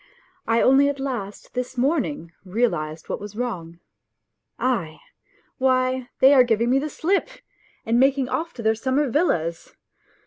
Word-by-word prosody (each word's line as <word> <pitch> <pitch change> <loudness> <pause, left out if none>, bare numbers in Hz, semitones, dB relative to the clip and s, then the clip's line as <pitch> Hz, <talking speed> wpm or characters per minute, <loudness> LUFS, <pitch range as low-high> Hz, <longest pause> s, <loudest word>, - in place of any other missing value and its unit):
I 230 0 +3
only 275 +2 +5
at 285 -1 -4
last 240 -7 -5
this 250 +1 -4
morning 275 - -1
realized 175 -7 -2
what - - -3
was 205 0 -9
wrong. 180 -9 -4 0.8
Aie! 195 -12 -1 0.6
Why, 255 -1 +1
they 270 +2 +8
are 260 -3 +7
giving 235 0 +1
me 270 - +4
the 300 +2 -3
slip 380 +10 0 0.6
and 230 +2 +2
making 270 0 +3
off 330 +5 -2
to 235 - -7
their 220 0 +3
summer 265 +6 0
villas 170 - -1
250 Hz, 145 wpm, -23 LUFS, 210-270 Hz, 0.8 s, they